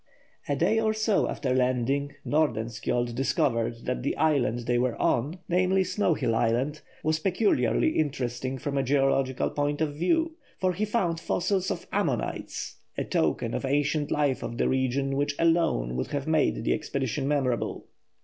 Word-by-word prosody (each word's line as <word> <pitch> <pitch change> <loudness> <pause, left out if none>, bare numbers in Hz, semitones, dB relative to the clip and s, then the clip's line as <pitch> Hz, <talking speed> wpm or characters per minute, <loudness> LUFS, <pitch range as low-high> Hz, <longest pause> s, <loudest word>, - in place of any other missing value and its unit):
A - - +2
day 225 - +2
or 220 -1 +1
so 215 -1 +2
after 130 -3 -1
landing, 130 +3 0
Nordenskjold 120 -4 0
discovered 115 -2 0
that 125 - -2
the 140 - -2
island 135 -7 +2
they 120 0 +1
were 125 -1 0
on 145 +9 +1
named 185 +2 +2
Snow 185 -2 +1
Hill 115 - 0
Island 120 +7 0 0.2
was 155 0 +1
peculiarly 180 - +2
interesting 130 -4 -2
from 140 +2 -2
a - - +1
geological 135 -1 +1
point 145 0 -1
of 155 -2 0
view, 320 - +1 0.2
for 185 -1 +1
he 205 +5 -1
found 190 -7 0
fossils 185 +2 0
of - - -3
ammonites, - - -2 0.2
a - - 0
token - - 0
of - - -2
ancient 145 +2 +1
life 145 -4 +1
of 120 - -5
the - - +2
region 130 +1 0
which 145 0 0
alone 165 - +2
would 65 - -2
have 140 -1 -3
made 160 -1 +1
the - - +2
expedition 135 -2 -2
memorable. 135 -5 -1
140 Hz, 160 wpm, -27 LUFS, 125-165 Hz, 0.2 s, A